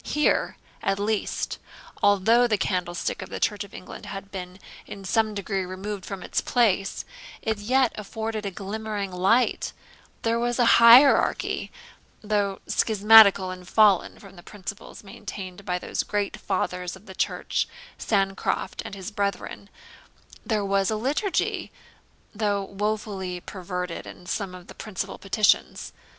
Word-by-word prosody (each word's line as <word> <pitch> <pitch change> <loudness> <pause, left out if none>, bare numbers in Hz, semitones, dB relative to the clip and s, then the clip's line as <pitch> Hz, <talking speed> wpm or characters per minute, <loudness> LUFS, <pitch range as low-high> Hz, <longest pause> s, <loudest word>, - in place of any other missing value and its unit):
Here, 300 0 +1 0.2
at 195 - 0
least, 210 0 -2 0.4
although 220 +5 +4
the 215 -3 +1
candlestick 180 -2 -2
of - - -7
the - - -5
Church 210 0 0
of 200 - -13
England 205 - -10
had 195 0 -7
been 180 -1 -7 0.3
in 195 -1 -9
some 220 +2 +1
degree 195 -1 -2
removed 190 +2 -6
from 195 -2 -6
its - - -1
place, 200 -5 +1 0.4
it 220 -2 -1
yet 250 +3 +2
afforded 220 +1 -4
a 200 - -2
glimmering 205 +1 -4
light; 195 +8 +2 0.5
there 230 0 +1
was 240 0 0
a 245 - +4 0.2
hierarchy, 245 +4 +6 0.5
though 205 -2 0
schismatical, 210 -3 +6
and 180 -1 -9
fallen 205 -3 +4
from 195 -2 -14
the - - -11
principles 200 +2 -9
maintained 195 -1 -8
by 180 0 -1
those - - -2
great 205 -1 -2
fathers 180 -3 -2
of 190 +2 -16
the 190 - -10
church, - - -1 0.3
Sancroft 195 -2 -1
and - - -7
his 190 +2 -7
brethren; 200 0 -3 0.7
there 215 -3 0
was 195 -1 +1
a 220 - 0
liturgy, 285 - -1 0.6
though 205 -2 0
woefully 200 -2 -3
perverted 180 -1 -5
in 180 - -11
some 185 0 -3
of 180 -1 -12
the - - -12
principal 215 -4 -5
petitions. 205 +2 +1
200 Hz, 140 wpm, -25 LUFS, 190-215 Hz, 0.7 s, hierarchy